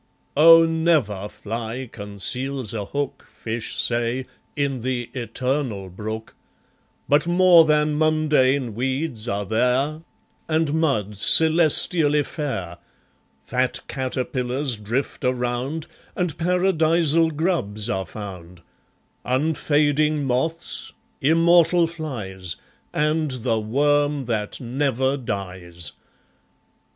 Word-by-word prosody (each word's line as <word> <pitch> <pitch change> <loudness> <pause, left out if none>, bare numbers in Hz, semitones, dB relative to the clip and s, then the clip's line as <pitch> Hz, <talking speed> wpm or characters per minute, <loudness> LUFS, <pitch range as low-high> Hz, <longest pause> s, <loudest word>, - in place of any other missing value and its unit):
Oh! 165 +2 +8
never 155 - +1
fly 115 +5 -5
conceals 115 +5 -3
a 105 -3 -3
hook, 140 +5 -4
Fish 110 0 -5
say, 120 +2 -1 0.3
in 140 -3 -1
the 120 -1 -3
Eternal 125 -5 -2
Brook, 110 +4 -6 0.7
But 150 +3 +3
more 175 -1 +6
than 150 -1 +2
mundane 150 -6 +2
weeds 130 0 -2
are 100 -3 -2
there, 125 +8 0 0.5
And 160 -2 +1
mud, 130 -11 0
celestially 155 - +4
fair; 95 - -5 0.6
Fat 125 0 -1
caterpillars 130 0 -2
drift 110 +6 -3
around, 125 +5 -2 0.3
And 180 -4 -1
Paradisal 165 -2 +2
grubs 150 - -1
are 95 -5 -2
found; 90 -3 -9 0.6
Unfading 150 +1 +1
moths, 135 +6 -1 0.3
immortal 165 +3 +4
flies, 110 - -6 0.4
And 150 +1 0
the 120 -3 -1
worm 145 +5 +1
that 110 -3 -3
never 130 +1 0
dies. 90 - -5
130 Hz, 95 wpm, -23 LUFS, 110-155 Hz, 0.7 s, Oh